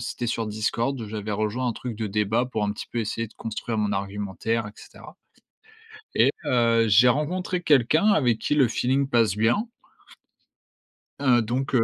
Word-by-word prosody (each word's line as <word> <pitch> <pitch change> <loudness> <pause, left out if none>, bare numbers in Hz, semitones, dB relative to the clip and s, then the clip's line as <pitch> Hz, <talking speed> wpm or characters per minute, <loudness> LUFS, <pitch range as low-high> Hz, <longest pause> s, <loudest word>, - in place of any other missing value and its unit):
c'était 120 0 -4
sur 115 -1 -2
Discord. 115 +3 -2
J'avais 105 0 -5
rejoint 110 +5 -1
un 120 - -1
truc 120 -4 -6
de 110 -1 -3
débat, 105 +4 0
pour 110 -4 -2
un 105 - -1
petit - - -8
peu 120 - -3
essayer 115 +1 -2
de 105 - -20
construire 115 +1 -5
mon 105 -1 0
argumentaire 100 +3 -3
et - - -8
cetera. - - -14 1.0
Et - - +4
heu, 115 -2 +3
j'ai 110 +5 +6
rencontré 175 +7 0
quelqu'un 155 - +3
avec 130 - +3
qui - - -1
le 135 -5 +4
feeling 135 +4 0
passe 115 -6 +2
bien. 120 - +1 1.5
Heu, 125 -4 +4
donc, 130 +5 -3
heu 115 - +4
115 Hz, 170 wpm, -24 LUFS, 105-130 Hz, 1.5 s, j'ai